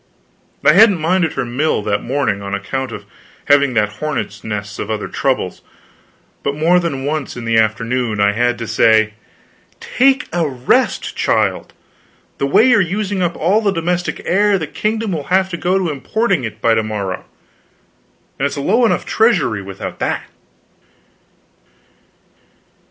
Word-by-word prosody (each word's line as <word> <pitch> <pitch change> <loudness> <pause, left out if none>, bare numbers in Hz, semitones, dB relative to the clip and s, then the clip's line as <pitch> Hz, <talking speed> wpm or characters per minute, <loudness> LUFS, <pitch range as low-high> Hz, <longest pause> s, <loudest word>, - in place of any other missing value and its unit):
I 150 - +7
hadn't 205 +1 +6
minded 165 0 +1
her 130 - -2
mill 125 0 -1
that 105 -1 -1
morning, 120 -6 -1
on 100 0 -3
account 130 +6 -4
of - - -8 0.4
having 140 -3 +3
that 105 -1 0
hornets' 155 -4 -4
nest 105 -1 -5
of 105 - -4
other 110 -1 -3
troubles; 130 -9 -2 0.8
but 140 - -2
more 165 +4 +3
than 140 -6 -3
once 150 -3 -3
in 120 - -6
the 115 -1 +3
afternoon 110 +1 0
I 100 0 +4
had 120 +3 0
to 115 - -5
say: 110 -1 +3 0.7
"Take 265 +1 +2
a 170 -3 0
rest, 125 -2 0
child; - - 0 0.7
the 140 - 0
way 225 - +4
you 245 - +5
are - - +5
using 195 +2 -2
up 175 -1 0
all 195 +7 +2
the 210 - +1
domestic 175 -1 -2
air, 200 +2 +3
the 160 - -3
kingdom 215 +6 -2
will 155 -5 -3
have 190 +1 +2
to 175 - -4
go 180 +2 +1
to 180 -4 -1
importing 180 - -1
it 110 - -7
by 115 - +3
to 110 - +2
morrow, 105 -4 -4 1.1
and 140 - +2
it's - - -6
a - - -2
low 220 - +2
enough - - -1
treasury 190 - +2
without 95 0 -7
that." - - -2
140 Hz, 160 wpm, -17 LUFS, 110-185 Hz, 1.1 s, I